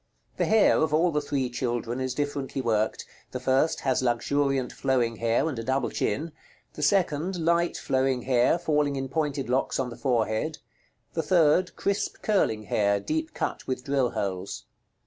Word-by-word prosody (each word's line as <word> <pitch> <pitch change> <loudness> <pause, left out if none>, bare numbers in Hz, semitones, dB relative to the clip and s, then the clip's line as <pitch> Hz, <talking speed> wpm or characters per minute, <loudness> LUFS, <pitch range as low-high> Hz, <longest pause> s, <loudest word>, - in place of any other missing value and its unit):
The - - +1
hair 220 -1 +4
of 155 -1 +2
all 170 +2 +3
the 150 -1 0
three 140 -3 -1
children 120 0 -2
is 130 -1 -2
differently 145 -1 -3
worked: 110 -3 0 0.2
the 125 - -5
first 130 +5 +1
has 130 -2 +1
luxuriant 130 +2 0
flowing 125 -4 0
hair, 115 +6 +1
and 140 -7 -3
a - - -4
double 130 +3 0
chin; 160 +3 -1 0.4
the - - -7
second, 175 +1 +1
light 170 +1 +2
flowing 130 -1 0
hair 125 +4 +3
falling 150 -3 +1
in 135 -1 -3
pointed 145 -1 -1
locks 130 +2 0
on 125 -2 -1
the - - -7
forehead; 120 +4 0 0.6
the 165 - 0
third, 170 +2 +3
crisp 200 0 -2
curling 150 - +1
hair, 100 0 +1
deep 315 - -3
cut - - -3
with 130 -1 -3
drill 135 -2 +1
holes. 95 - -4
135 Hz, 165 wpm, -27 LUFS, 120-155 Hz, 0.6 s, hair